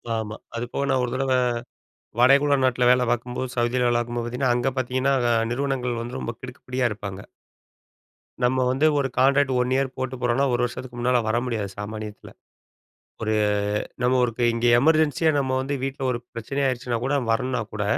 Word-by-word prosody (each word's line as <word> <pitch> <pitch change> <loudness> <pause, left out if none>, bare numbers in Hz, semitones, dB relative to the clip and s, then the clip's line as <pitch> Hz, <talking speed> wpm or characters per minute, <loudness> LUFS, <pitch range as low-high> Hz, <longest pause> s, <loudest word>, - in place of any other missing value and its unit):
ஆமா, 110 -1 -4 0.2
அது 115 +1 -2
போக - - -1
நான் 130 -1 +2
ஒரு 120 - -2
தடவ 135 0 -1 0.9
வடகுழ 140 +3 +5
நாட்ல 125 -1 +3
வேல 125 0 +4
பார்க்கும்போது 125 +1 -2
சவுதியில 120 +1 +1
வேல 120 - +2
பார்க்கும்போது 120 0 -3
பார்த்தீங்கன்னா, 125 +1 0
அங்க 125 +2 0
பார்த்தீங்கன்னா 130 +2 +1 0.4
நிறுவனங்கள் 125 -2 -1
வந்து 120 +2 -6
ரொம்ப 115 - -4
கிடுக்கு 130 +1 -10
புடியா 125 0 0
இருப்பாங்க. 100 -2 -7 1.2
நம்ம 130 +1 +2
வந்து 135 +4 +1
ஒரு 135 - +1
கான்ட்ராக்ட் 135 +1 +4
1 125 0 +1
இயர் 135 0 +1
போட்டு 130 0 -3
போறோம்னா, 125 +3 +2
1 120 - +1
வருஷத்துக்கு 125 0 -7
முன்னால 125 0 +2
வர 110 +2 +1
முடியாது 110 -5 -2
சாமானியத்துல. 105 0 -7 0.9
ஒரு 110 -1 0 0.7
நம்ம 125 +1 +3
ஒரு 120 - +1
இப்ப 120 - -2
இங்கே 120 +1 +2
எமர்ஜென்ஸியா 155 +2 +3
நம்ம 130 -1 -1
வந்து 140 +2 -2
வீட்ல 135 0 -4
ஒரு 120 - -2
பிரச்சனை 115 +5 -4
ஆயிடுச்சுனா 125 -2 -2
கூட 140 +2 +1 0.2
வரணுனா 125 +2 0
கூட, 105 -1 -2
125 Hz, 170 wpm, -24 LUFS, 120-130 Hz, 1.2 s, வடகுழ